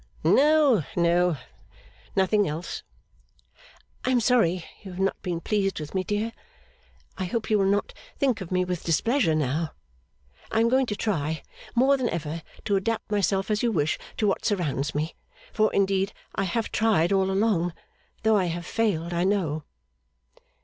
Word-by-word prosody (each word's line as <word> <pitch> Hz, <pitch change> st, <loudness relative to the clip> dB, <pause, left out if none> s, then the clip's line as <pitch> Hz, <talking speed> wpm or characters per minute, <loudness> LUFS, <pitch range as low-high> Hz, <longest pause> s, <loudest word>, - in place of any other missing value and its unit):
'No, 290 Hz, -, +5 dB
no. 175 Hz, -1 st, +3 dB, 0.8 s
Nothing 200 Hz, +2 st, +3 dB
else.' 160 Hz, +4 st, -4 dB, 1.2 s
'I -, -, 0 dB
am 255 Hz, -1 st, +4 dB
sorry 200 Hz, -8 st, +2 dB, 0.2 s
you 195 Hz, -, -9 dB
have 180 Hz, 0 st, -8 dB
not 195 Hz, 0 st, 0 dB
been 175 Hz, -3 st, -2 dB
pleased 195 Hz, 0 st, 0 dB
with 150 Hz, -1 st, -7 dB
me, 190 Hz, -1 st, 0 dB
dear. 210 Hz, +4 st, -1 dB, 0.9 s
I 185 Hz, -, -1 dB
hope 220 Hz, +4 st, -3 dB
you 210 Hz, -, +4 dB
will 195 Hz, -, +3 dB
not 205 Hz, +1 st, 0 dB, 0.2 s
think 255 Hz, -6 st, +1 dB
of 185 Hz, -, -7 dB
me 185 Hz, 0 st, +2 dB
with 180 Hz, -2 st, -3 dB
displeasure 170 Hz, -, +2 dB
now. 155 Hz, +2 st, -1 dB, 0.8 s
I 220 Hz, -, +2 dB
am 230 Hz, +1 st, +4 dB
going 260 Hz, +1 st, +3 dB
to 210 Hz, -, -2 dB
try, 160 Hz, -7 st, -1 dB, 0.3 s
more 270 Hz, +3 st, +4 dB
than 250 Hz, -3 st, 0 dB
ever, 165 Hz, 0 st, -3 dB, 0.2 s
to 200 Hz, -2 st, +2 dB
adapt 220 Hz, +2 st, -2 dB
myself 200 Hz, 0 st, +1 dB
as 210 Hz, -, +1 dB
you 240 Hz, -, +2 dB
wish 155 Hz, -6 st, 0 dB, 0.2 s
to 215 Hz, -, +1 dB
what 200 Hz, -, +1 dB
surrounds 150 Hz, -9 st, -1 dB
me 155 Hz, +2 st, -1 dB, 0.4 s
for 215 Hz, 0 st, +3 dB
indeed 195 Hz, 0 st, +1 dB, 0.2 s
I 195 Hz, -, -1 dB
have 225 Hz, +5 st, -2 dB
tried 200 Hz, -5 st, +2 dB
all 190 Hz, -1 st, +2 dB
along, 190 Hz, -3 st, +1 dB, 0.5 s
though 220 Hz, -1 st, +4 dB
I 190 Hz, -, +2 dB
have 175 Hz, 0 st, -3 dB
failed, 175 Hz, -6 st, 0 dB
I 170 Hz, +1 st, +1 dB
know. 170 Hz, -6 st, 0 dB
195 Hz, 165 wpm, -26 LUFS, 170-220 Hz, 1.2 s, No